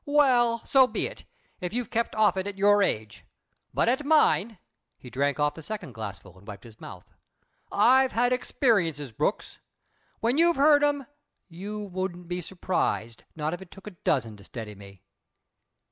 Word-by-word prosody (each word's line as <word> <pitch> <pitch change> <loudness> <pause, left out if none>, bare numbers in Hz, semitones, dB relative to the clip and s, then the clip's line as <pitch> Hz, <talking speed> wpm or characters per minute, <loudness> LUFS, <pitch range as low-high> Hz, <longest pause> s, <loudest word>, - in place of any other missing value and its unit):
"Well, 250 -5 +3
so 265 -2 +5
be - - -2
it - - -8 0.3
if 180 +2 -4
you've 240 -2 -3
kept 235 0 -1
off 215 -4 +3
it 190 +1 -2
at 200 -1 -6
your 205 +1 +4
age. 110 - -2 0.5
But - - +1
at 260 +5 +1
mine" 255 -8 +3 0.4
he 125 - -13
drank 140 +2 0
off 145 0 +2
the 160 - -10
second 190 - -6
glassful 100 -4 -8
and 100 - -20
wiped 100 -2 -9
his 115 -2 -15
mouth - - -11 0.6
"I've 260 +5 +4
had 245 +2 +2
experiences, 175 - 0
Brooks. 110 - -2 0.6
When 240 +6 +1
you've 340 0 +5
heard 290 +1 +5
'em, 290 -2 +1 0.4
you 200 +5 -6
wouldn't 185 -3 -5
be 180 +1 -3
surprised, 120 - -2
not 155 0 -2
if 175 - -6
it 190 - -12
took 195 +1 -14
a 210 - -7
dozen 130 - -1
to 100 - -15
steady 110 -1 -8
me." 100 -2 -14
190 Hz, 175 wpm, -27 LUFS, -, 0.6 s, so